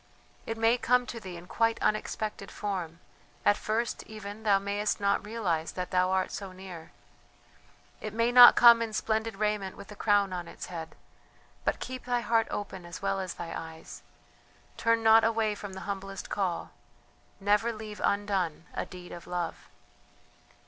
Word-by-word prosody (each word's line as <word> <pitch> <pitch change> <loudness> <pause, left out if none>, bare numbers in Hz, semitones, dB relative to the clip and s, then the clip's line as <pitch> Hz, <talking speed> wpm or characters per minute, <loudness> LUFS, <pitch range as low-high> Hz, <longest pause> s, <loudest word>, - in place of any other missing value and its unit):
It 225 - -3
may 225 +2 +3
come 250 +1 +3
to 235 - -6
thee 185 -4 -8
in 170 - -11
quite 230 +4 +1
unexpected 215 -1 -2
form 180 -5 -4 0.4
at 205 - +6
first 225 +3 -2
even 215 0 -8
thou 205 -3 +4
mayest 200 +1 -1
not 200 0 +1
realize 195 -7 -2
that 180 -1 -4
thou 185 0 +3
art 190 0 +1
so 195 -2 -6
near; 185 -3 -10 1.1
it 215 - -5
may 230 +2 +1
not 245 0 +10
come 235 -1 +8
in 225 -1 -2
splendid 220 0 -1
raiment 210 -2 -1
with 200 +1 -11
a - - -8
crown 205 -2 +2
on 175 -1 -4
its - - -8
head, 165 -1 -6 0.7
but - - 0
keep 255 0 -6
thy 245 -1 0
heart 230 -1 +2
open 190 -3 -5
as 175 +2 -9
well 195 0 0
as 185 -2 -4
thy 165 -1 -6
eyes; 160 0 -8 0.7
turn 230 0 +2
not 225 0 +7
away 225 -1 +2
from 205 -1 -8
the 190 - -7
humblest 195 -1 -5
call, 190 -4 -2 0.7
never 210 +4 +2
leave 215 -1 -8
undone 195 -6 0
a - - -3
deed 180 -1 -10
of 175 - -9
love. 175 -1 -4
205 Hz, 170 wpm, -29 LUFS, 185-225 Hz, 1.1 s, not